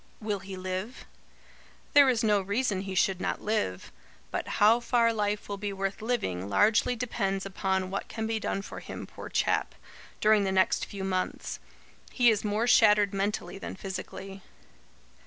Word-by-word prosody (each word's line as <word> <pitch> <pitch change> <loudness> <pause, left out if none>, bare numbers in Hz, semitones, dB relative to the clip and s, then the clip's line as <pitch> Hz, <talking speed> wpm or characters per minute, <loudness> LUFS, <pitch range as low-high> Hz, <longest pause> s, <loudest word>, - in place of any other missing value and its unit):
'" - - -32
"Will 205 -1 0
he 190 0 -8
live?" 185 +5 -5 0.9
"There 285 -2 +7
is 240 -3 +1
no 210 -2 +3
reason 200 0 0
he 190 -1 -5
should 185 0 +2
not - - -1
live. 150 - -2 0.4
But - - -3
how 220 +3 +6
far 235 -1 +2
life 210 -1 -1
will 200 - -4
be 205 0 -3
worth 195 +1 -3
living, 100 - -2
largely 220 - +3
depends 195 -5 -2
upon 190 -1 -1
what 195 - -3
can 220 -1 -4
be 220 0 -1
done 195 -1 -2
for - - -8
him, - - -7
poor - - -10
chap, - - 0 0.4
during 215 -1 +4
the 190 - 0
next 190 0 +2
few 195 -1 -6
months. 185 -1 -2 0.5
He 245 -3 +5
is 210 - -1
more 210 +2 0
shattered 210 -4 +5
mentally 195 0 -2
than - - -6
physically." 195 0 -7
205 Hz, 170 wpm, -28 LUFS, 190-220 Hz, 0.9 s, There